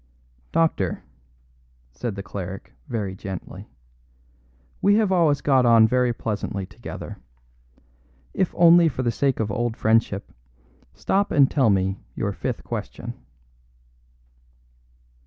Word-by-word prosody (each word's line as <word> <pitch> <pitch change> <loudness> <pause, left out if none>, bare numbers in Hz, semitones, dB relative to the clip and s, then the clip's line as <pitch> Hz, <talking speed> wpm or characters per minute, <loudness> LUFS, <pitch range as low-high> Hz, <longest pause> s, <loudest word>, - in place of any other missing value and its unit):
"Doctor," 160 - 0 0.9
said 100 - -5
the 100 - -6
cleric 95 -1 -7
very 105 -5 -3
gently, 95 -1 -8 1.1
"we 200 +1 +4
have 215 -3 +2
always 160 -6 +3
got 135 -3 +3
on 115 -2 +6
very 125 +1 +2
pleasantly 100 -4 -3
together. - - -9 1.1
If 185 - 0
only 170 0 +7
for 130 -2 -4
the 120 - +1
sake 135 +2 0
of 110 -2 -1
old 120 +1 -2
friendship, 110 -3 +1 0.6
stop 200 - 0
and 140 -2 +4
tell 130 -7 +3
me 95 -1 +1 0.2
your - - -1
fifth - - -4
question." - - -6
120 Hz, 115 wpm, -23 LUFS, 100-145 Hz, 1.1 s, only